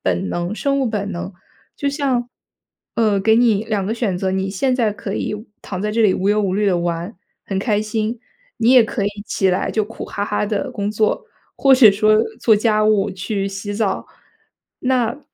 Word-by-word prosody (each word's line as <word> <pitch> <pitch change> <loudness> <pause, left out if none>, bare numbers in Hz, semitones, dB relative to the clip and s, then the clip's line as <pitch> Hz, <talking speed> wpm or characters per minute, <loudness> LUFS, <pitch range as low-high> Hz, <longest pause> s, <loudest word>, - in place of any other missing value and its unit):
本 90 0 -1
能 175 - -2
生 275 +4 0
物 265 - +1
本 205 -2 -2
能。 180 +2 -5 0.4
就 280 - -2
像， 270 -4 -1 0.7
呃， 215 -3 +2
给 220 +3 +3
你 225 -3 +3
2 210 -4 -1
个 220 - -1
选 210 -7 -1
择， 190 0 -1
你 190 0 -1
现 250 +7 0
在 225 -4 +1
可 205 -1 -5
以 210 - -2 0.3
躺 185 -2 -5
在 210 +1 -1
这 225 +2 +1
里 205 -4 +5
无 190 - -1
忧 210 +1 +3
无 200 -3 0
虑 205 +1 +1
地 190 -3 +3
玩， 170 +3 -3 0.3
很 195 -1 -2
开 210 0 +1
心。 215 +2 -2 0.4
你 230 +2 +3
也 245 -3 +7
可 215 - -3
以 - - +3 0.2
起 195 -2 0
来 185 - 0
就 215 - 0
苦 225 +2 -7
哈 205 - -5
哈 205 0 -1
地 205 -1 -2
工 205 0 -2
作， 215 - 0 0.3
或 270 -1 +5
者 245 -5 +8
说 215 +2 +3 0.2
做 220 - +4
家 215 0 +2
务、 210 -1 +2
去 195 +1 -3
洗 200 +1 -5
澡。 205 -1 -1 0.7
那 250 -1 0
210 Hz, 215 characters per minute, -20 LUFS, 195-225 Hz, 0.7 s, 者